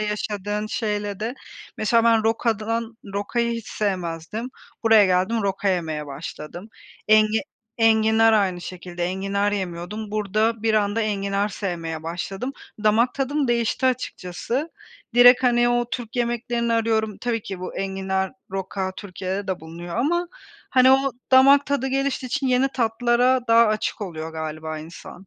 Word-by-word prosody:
yaşadığın 210 0 -2
şeyle 210 -2 -3
de. 230 +4 -3 0.4
Mesela 230 +2 +2
ben 225 -1 +4
rokadan 225 0 -1 0.2
Rokayı 235 +4 -1
hiç 230 - -8
sevmezdim. 185 +3 -3 0.3
Buraya 225 -3 +6
geldim, 190 +5 +1
roka 195 0 -1
yemeye 160 -5 -1
başladım. 150 +6 -8 0.4
Engi 215 0 +5 0.4
enginar 225 0 +4
aynı 190 -5 +2
şekilde, 175 -1 -6
enginar 195 +2 -1
yemiyordum. 195 +2 -4
Burada 215 +2 0
bir 220 -1 +2
anda 205 +1 +1
enginar 200 -1 0
sevmeye 165 -6 -4
başladım. 195 +9 -4 0.3
Damak 225 +4 +3
tadım 275 0 -1
değişti, 240 +2 +1
açıkçası. 255 - -2 0.4
Direkt, 245 +1 +8
hani, 240 -1 +3
o 240 0 0
Türk 240 -1 -5
yemeklerini 235 0 -1
arıyorum, 220 -2 0
tabii 230 -3 -2
ki 190 -2 -7
bu 185 - -6
enginar, 190 0 -2 0.2
roka 190 0 -3
Türkiye'de 195 0 -5
de 190 -3 -3
bulunuyor 170 +2 -8
ama, 345 +8 +1 0.4
hani, 260 0 +6
o 270 -1 +3 0.2
damak 275 +2 +7
tadı 280 -2 0
geliştiği 270 0 -1
için 285 +1 -1
yeni 255 +1 +3
tatlara 245 +1 +2
daha 230 0 +6
açık 215 +1 -1
oluyor 160 -5 -5
galiba 155 0 -5
insan. 170 +4 -11
215 Hz, 140 wpm, -23 LUFS, 190-235 Hz, 0.4 s, Direkt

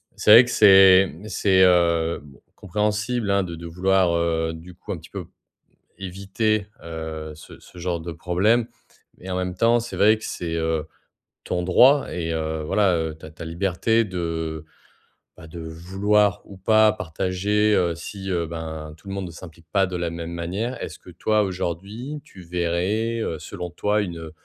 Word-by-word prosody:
c'est 105 - +3
vrai 115 +3 +10
que 120 - -5
c'est, 95 -3 +7
mmh, 85 +8 -11
c'est, 95 -2 +3
heu, 85 -2 +3
bon 70 -2 -16 0.2
compréhensible, 105 +3 -1
hein, 100 -1 +2
de 85 -2 -6
de 85 - -10
vouloir, 90 +1 +2
heu, 80 -1 0
du 85 +2 -11
coup - - -9
un - - -3
petit - - -14
peu - - -6 0.7
éviter, 100 +3 -1 0.2
heu, 80 -1 -6
ce 75 - -13
ce 90 - -16
genre 85 -1 -2
de 85 +1 -6
problème 105 +8 +1 0.5
et 95 +1 -8
en 90 - -1
même 90 -1 -2
temps, 115 +3 +3
c'est 120 - -7
vrai 110 +2 +5
que - - -11
c'est, 85 -2 -4
heu, 80 -1 -1 0.6
ton 90 - -2
droit 130 +10 +5
et 85 -2 -3
heu, 80 -1 -2
voilà, 95 +3 +2
heu, 80 -1 -3
ta 80 0 -12
ta 80 - -10
liberté 95 +7 +1
de, 80 -4 -4 0.7
bah, 80 0 -13
de 85 - -9
vouloir 95 +5 0
ou 100 - -12
pas 110 +2 +4
partager, 105 +2 0
heu, 85 -2 +2
si, 95 +3 -7
heu, 85 -2 0
ben 80 -2 -6
tout 80 - -15
le 95 - -4
monde 100 -1 -4
ne 85 - -8
s'implique 85 -1 -13
pas 95 -1 +3
de 90 - -5
la 85 -1 -2
même 85 0 -6
manière. 95 +9 -3
Est-ce 80 - -7
que 90 - -13
toi 105 +5 +1
aujourd'hui, 100 - -4
tu 95 - -14
verrais, 90 +7 -1
heu, 80 -7 -3
selon 90 +2 -7
toi 105 +4 0
une 85 -4 -6
90 Hz, 185 wpm, -23 LUFS, 85-105 Hz, 0.7 s, vrai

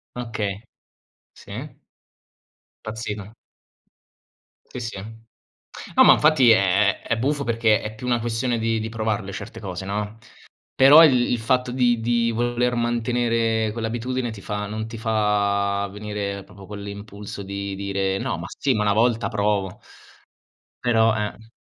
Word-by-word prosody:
Okay, 110 -5 -3 0.7
sì. 125 +9 -9 1.0
Impazzivano. 110 -1 -6 1.3
Sì, - - -7
sì. 115 -4 -5 1.0
No, - - +8
ma - - +9
infatti 150 -5 +5
è 100 -1 +3
è 115 - -1
buffo 140 +4 0
perché 115 -3 +2
è 105 - -5
più 125 +3 -7
una 120 -1 +2
questione 120 +1 -1
di 115 0 0
di 110 +1 -4
provarle 110 -3 -2
certe 105 +2 -8
cose, 95 -3 -6
no? 105 +2 -3 0.6
Però 145 +5 +9
il 125 -5 +4
il 120 - +1
fatto 125 +2 0
di 120 -2 +2
di 115 0 +1
voler 120 +1 0
mantenere 115 -2 0
quell'abitudine 120 +2 -3
ti 110 -3 -9
fa 105 +1 -4
non 110 +1 -4
ti 115 0 -8
fa 100 -2 +1
venire 100 -1 -4
proprio 100 -1 -14
quell'impulso 100 0 -8
di 100 0 -5
dire: 95 -1 -1
"No, 90 - -2
ma 85 - -6
sì, 135 -2 +1
ma 105 - 0
una 105 -1 +2
volta 115 +2 +2
provo." 100 -3 -1 1.0
Però, 115 -2 +4
eh 110 +1 -5
110 Hz, 140 wpm, -23 LUFS, 100-120 Hz, 1.3 s, ma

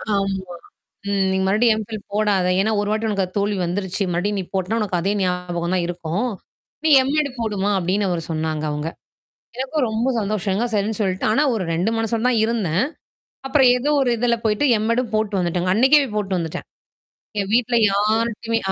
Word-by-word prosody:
ஆமா. 195 -2 -2 0.6
ம். 195 -1 +1
"நீங்க 190 0 0
மறுபடியும் 215 +3 +3
M.Phil 215 0 -6
போடாத. 205 -3 +2
ஏன்னா 215 +3 +2
ஒரு 205 0 -1
வாட்டி 220 +1 0
உனக்கு 195 -2 0
தோல்வி 200 0 0
வந்துருச்சு. 190 +2 -2
மறுபடியும் 200 +4 -1
நீ - - -2
போட்டனா 190 +4 0
உனக்கு 190 -4 -1
அதே 195 - 0
ஞாபகம் 180 -1 -2
தான் 180 - +1
இருக்கும். 175 +6 -2 0.6
நீ - - +4 0.2
M.Ed. 300 +1 +1
போடுமா?" 205 -3 -1
அப்பிடின்னு 190 +2 0
அவரு 170 -2 -2
சொன்னாங்க 155 -1 -2
அவுங்க. 150 +2 -3 0.7
எனக்கும் 265 +2 -1
ரொம்ப 225 +4 -1
சந்தோஷங்க. 205 +1 -1
சரின்னு 210 +1 0
சொல்லிட்டு. 190 -2 -1
ஆனா, 255 - +3
ஒரு 205 - -2
2 175 +6 +1
மனசோட 225 0 -1
தான் 245 -3 +2
இருந்தேன். 210 -5 0 0.6
அப்புறம் 270 -1 +4
ஏதோ 280 +4 -1
ஒரு 250 - +1
இதுல 235 0 +2
போயிட்டு 215 +5 +1 0.2
M.Ed. 230 +2 +1
ம் 220 - -15
போட்டு 215 -2 0
வந்துட்டேங்க. 175 +1 0
அன்னக்கே 265 +7 +5
போய் 230 -6 -4
போட்டு 200 -3 -1
வந்துட்டேன். 165 -2 -5 0.7
என் 195 - -3
வீட்ல 245 0 +2
யார்ட்டயுமே 225 +2 0
205 Hz, 175 wpm, -21 LUFS, 185-225 Hz, 0.7 s, அன்னக்கே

